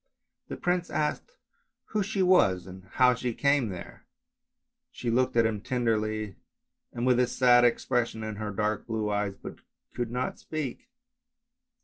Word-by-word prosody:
The - - -6
prince 180 0 0
asked 155 - -2 0.6
who 215 - 0
she 195 -1 0
was 100 - +4
and 95 0 -11
how 125 -1 +5
she 120 -1 -3
came 140 -5 +2
there, 90 -3 -9 0.8
she 120 - -3
looked 125 0 +1
at 115 - +5
him 110 -2 -1
tenderly 110 -4 -1 0.5
and 120 +1 -3
with 125 -1 +4
a 125 - +3
sad 120 0 +5
ex 120 - +2
pression 115 -2 0
in 110 -1 -5
her 105 0 -4
dark 105 +1 -2
blue 110 -2 -1
eyes, 105 -1 -1
but - - -9 0.3
could 120 -2 -3
not 125 +2 -3
speak. 155 - -5
120 Hz, 155 wpm, -28 LUFS, 105-130 Hz, 0.8 s, how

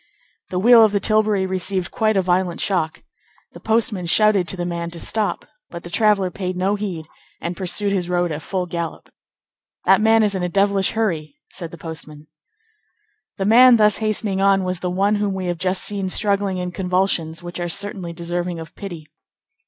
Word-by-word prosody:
The 180 - -3
wheel 230 +4 +7
of 215 -2 +3
the 200 - +2
tilbury 215 -2 +2
received 185 0 -2
quite 215 -2 +1
a 190 - +2
violent 180 -1 0
shock. 175 -5 -1 0.5
The - - -12
postman 220 -5 0
shouted 205 0 +3
to 190 - -3
the 175 - -3
man 170 -1 -3
to 170 0 -10
stop, 215 +4 -2 0.2
but 170 0 -8
the 175 - -9
traveller 200 -2 +2
paid 185 0 -4
no 190 +2 +1
heed 195 -6 -4 0.3
and 170 +1 -4
pursued 195 +3 0
his 180 -3 -1
road 175 -1 0
at 150 +1 -4
full 185 +2 -3
gallop. 170 -1 -6 0.7
"That - - +5
man 220 0 +4
is 205 -1 +1
in 190 - -2
a 180 - -1
devilish 195 0 +2
hurry!" 190 - -2 0.2
said 170 -3 -5
the 170 - -11
postman. 155 -2 -9 1.1
The 195 - -2
man 240 +3 +7
thus 210 -1 +4
hastening 215 -3 -1
on 195 -1 +3
was 185 -1 -2
the 180 - -2
one 200 +3 +1
whom 205 -2 -1
we 190 -1 -4
have 175 -1 -3
just 185 0 -1
seen 200 -2 -1
struggling 200 -1 0
in 180 0 -3
convulsions 180 -3 -1
which 175 0 -7
are 175 0 -2
certainly 195 -1 -3
deserving 175 0 -4
of 160 - -10
pity. 175 -6 -8
185 Hz, 190 wpm, -21 LUFS, 175-205 Hz, 1.1 s, wheel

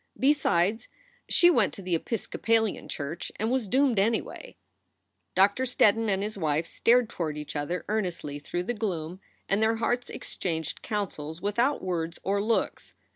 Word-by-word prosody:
Besides, 225 -7 +2 0.4
she 350 0 +6
went 230 - +2
to - - -8
the 180 -1 -2
Episcopalian 225 +3 0
church 150 +3 -5
and 220 +2 -1
was 255 -4 0
doomed, 260 -1 +3
anyway. 230 - -1 0.8
Doctor 200 +5 +4
Steddon 225 -3 +3
and 195 0 +1
his 210 -1 -4
wife 155 -1 +1
stared 240 +6 +3
toward 155 -6 -4
each 150 0 -6
other 150 +5 -2
earnestly 180 -9 -2
through 175 +5 -3
the 240 - -2
gloom 185 -6 -3 0.3
and 195 +2 +1
their 220 +1 +3
hearts 245 +2 -1
exchanged 160 -4 -3
counsels 170 -7 -4
without 235 +9 0
words 170 -3 -2
or 200 +1 +1
looks. 225 +2 -1
200 Hz, 150 wpm, -27 LUFS, 170-230 Hz, 0.8 s, she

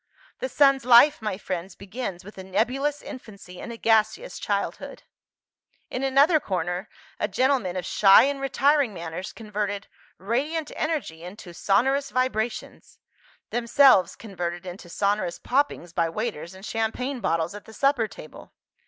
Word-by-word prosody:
"The - - -3
sun's 275 -3 +4
life, 250 +3 +6
my 210 -3 -3
friends, 185 -1 -5
begins 200 -3 -6
with 205 - -11
a - - -7
nebulous 255 +10 -1
infancy 210 -10 -10
and 235 - -7
a 230 - -8
gaseous 225 - +1
childhood." - - -3 0.9
In 255 - -3
another 280 +4 +4
corner, 180 - -3 0.3
a - - 0
gentleman 245 -4 +1
of 180 -2 -3
shy 195 0 +6
and 275 0 -1
retiring 275 -3 +2
manners 170 +4 -6
converted 210 -2 -4 0.3
"radiant 290 - -2
energy 300 - -3
into 180 -1 -10
sonorous 265 +10 +1
vibrations" 245 -3 -3 0.5
themselves 235 -6 +4
converted 175 -4 -5
into 180 -1 -9
sonorous 200 -2 -1
poppings 255 - -1
by 165 -1 +1
waiters 190 -3 -4
and 190 +2 -11
champagne 245 +5 -2
bottles 165 -3 -1
at 205 - -10
the - - -13
supper 275 -3 +2
table. 200 -6 -13
220 Hz, 140 wpm, -25 LUFS, 185-270 Hz, 0.9 s, life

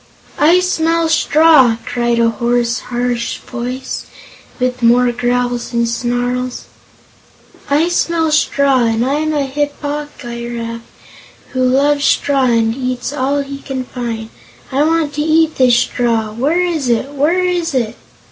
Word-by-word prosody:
"I 335 +5 +5
smell 330 -2 +1
straw!" 305 -7 +4
cried 240 -1 0
a 230 0 +3
hoarse, 235 +1 0
harsh 245 -1 -2
voice, 250 +1 -6 0.5
with 250 0 -1
more 240 +1 +4
growls 245 0 -1
and 235 0 +1
snarls. 245 +1 -2 1.1
"I 295 +4 +3
smell 335 -2 0
straw, 280 -4 +2
and 225 +1 +1
I'm 300 +4 0
a 290 -2 0
Hip 290 +2 -3
po 295 +1 -3
gy 235 -2 -6
raf 230 0 -5 0.7
who 255 -1 -1
loves 285 +3 +2
straw 275 -2 +2
and 230 -2 +2
eats 255 +1 -3
all 280 +1 0
he 275 0 -8
can 265 -2 -5
find. 230 -3 -5 0.4
I 270 +2 +1
want 320 -2 +1
to 295 - -2
eat 315 +1 +2
this 250 -2 +4
straw! 230 -3 0
Where 285 +11 0
is 315 -7 -2
it? 240 +4 0
Where 305 +6 +1
is 350 -4 -1
it?" 235 -3 -1
255 Hz, 145 wpm, -16 LUFS, 240-295 Hz, 1.1 s, I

